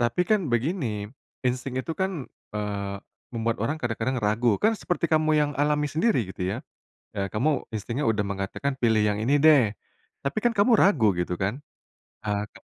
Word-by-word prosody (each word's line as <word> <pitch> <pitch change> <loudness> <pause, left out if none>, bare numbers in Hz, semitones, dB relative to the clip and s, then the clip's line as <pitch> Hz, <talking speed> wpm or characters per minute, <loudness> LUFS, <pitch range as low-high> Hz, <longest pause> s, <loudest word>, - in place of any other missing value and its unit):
Tapi 120 +8 +1
kan 195 -6 +1
begini, 120 - -1 0.4
insting 125 +1 -1
itu 145 +5 -2
kan, 190 -6 -2 0.3
eee, 100 -1 -3 0.4
membuat 115 -1 -1
orang 145 +8 0
kadang-kadang 120 -1 -2
ragu. 110 0 +2
Kan 220 +1 +3
seperti 175 -4 -2
kamu 155 0 +3
yang 150 -1 +2
alami 150 0 +2
sendiri, 155 - +1
gitu - - -15 0.2
ya. 140 - -9 0.5
Eee, 100 -1 -1
kamu 140 +6 +1
instingnya 115 +6 -2
udah 110 -2 +2
mengatakan, 100 +8 -3
"Pilih 110 -3 +3
yang 105 0 +1
ini 140 +6 +2
deh." 135 -10 +6 0.5
Tapi 140 +9 -1
kan 240 +1 +2
kamu 215 +2 +4
ragu 130 - +5
gitu 90 0 -1
kan? 100 +9 -2 0.6
Eee, 105 -1 -1
ke - - -16
125 Hz, 170 wpm, -26 LUFS, 105-155 Hz, 0.6 s, deh